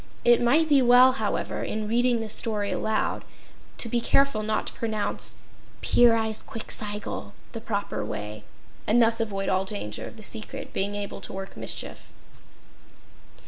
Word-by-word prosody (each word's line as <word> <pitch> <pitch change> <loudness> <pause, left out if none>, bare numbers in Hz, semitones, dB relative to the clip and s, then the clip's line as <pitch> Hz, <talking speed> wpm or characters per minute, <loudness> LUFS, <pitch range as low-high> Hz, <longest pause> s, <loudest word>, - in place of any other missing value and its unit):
It 240 0 +6
might 290 +7 +4
be 285 -3 +5
well, 250 +1 +7
however, 260 - -2
in 215 -1 -3
reading 240 +1 +2
this 215 -1 -1
story 210 -3 +1
aloud, 220 0 -1 0.5
to - - 0
be 235 +1 0
careful 275 -2 +3
not 215 0 -1
to - - -6
pronounce 220 -2 -2 0.5
Pyrzqxgl 220 - +1 0.2
the 230 - -6
proper 205 - -3
way, 105 0 -6 0.4
and 225 +3 +4
thus 230 0 +3
avoid 195 -3 -2
all 190 0 +2
danger 190 - -5
of - - -12
the 215 - -11
secret 240 +5 -6
being 200 +1 -1
able 205 -1 -5
to - - -5
work 195 0 -6
mischief. - - -5
220 Hz, 145 wpm, -26 LUFS, 205-240 Hz, 0.5 s, well